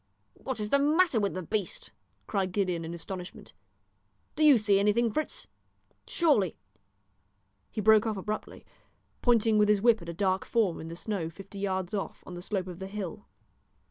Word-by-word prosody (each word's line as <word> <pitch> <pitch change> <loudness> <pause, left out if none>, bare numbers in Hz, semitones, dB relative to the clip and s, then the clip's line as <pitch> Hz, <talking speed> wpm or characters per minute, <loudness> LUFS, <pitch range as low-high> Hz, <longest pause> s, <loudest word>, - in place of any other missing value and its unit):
"What 260 -3 -5
is 210 0 -3
the 280 - +4
matter 305 -2 +3
with 200 -3 -1
the 185 - -4
beast?" 185 - -3 0.3
cried 190 - -1
Gideon 185 -4 0
in 165 - -5
astonishment. 180 +1 -8 0.8
"Do 310 - +1
you 295 -4 +8
see 205 -2 +3
anything, 215 +3 +2
Fritz? 310 +8 -3 0.6
Surely 280 - +2 0.6
" 100 0 -45
He 215 - -3
broke 220 +1 +5
off 215 -2 -1
abruptly, 210 +3 -5 0.6
pointing 225 -3 +3
with 210 0 +4
his 210 -1 +4
whip 230 -1 +4
at 170 - -8
a - - -4
dark 190 0 +1
form 215 -8 0
in 160 - -7
the 165 - -7
snow 180 -3 -3
fifty 195 +4 -11
yards 190 -2 -2
off, 200 - -4
on 180 - -9
the 175 - -7
slope 190 0 -2
of 180 -1 -8
the 190 - -5
hill. 200 -1 -6
200 Hz, 180 wpm, -29 LUFS, 180-220 Hz, 0.8 s, you